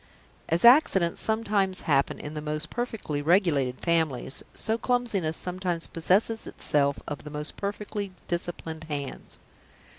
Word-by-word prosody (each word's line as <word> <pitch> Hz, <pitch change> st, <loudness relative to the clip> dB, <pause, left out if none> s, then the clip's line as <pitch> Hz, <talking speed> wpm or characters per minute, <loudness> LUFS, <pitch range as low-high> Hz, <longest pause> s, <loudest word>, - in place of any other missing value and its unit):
As 170 Hz, +6 st, +2 dB
accidents 215 Hz, -, +5 dB
sometimes 205 Hz, -4 st, +1 dB
happen 140 Hz, -3 st, +1 dB
in 150 Hz, -, -7 dB
the 150 Hz, -, -5 dB
most 155 Hz, 0 st, -3 dB
perfectly 225 Hz, -11 st, -3 dB
regulated 145 Hz, -6 st, +2 dB
families, 160 Hz, -6 st, 0 dB
so 225 Hz, -, 0 dB
clumsiness 230 Hz, -10 st, 0 dB
sometimes 180 Hz, -2 st, -1 dB
possesses 200 Hz, +7 st, +1 dB
itself 140 Hz, -1 st, +2 dB
of 145 Hz, -, -5 dB
the 150 Hz, -, -8 dB
most 150 Hz, +1 st, -3 dB
perfectly 205 Hz, 0 st, -4 dB, 0.2 s
disciplined 165 Hz, -2 st, -4 dB
hands. 145 Hz, -3 st, -5 dB
170 Hz, 125 wpm, -27 LUFS, 150-205 Hz, 0.2 s, accidents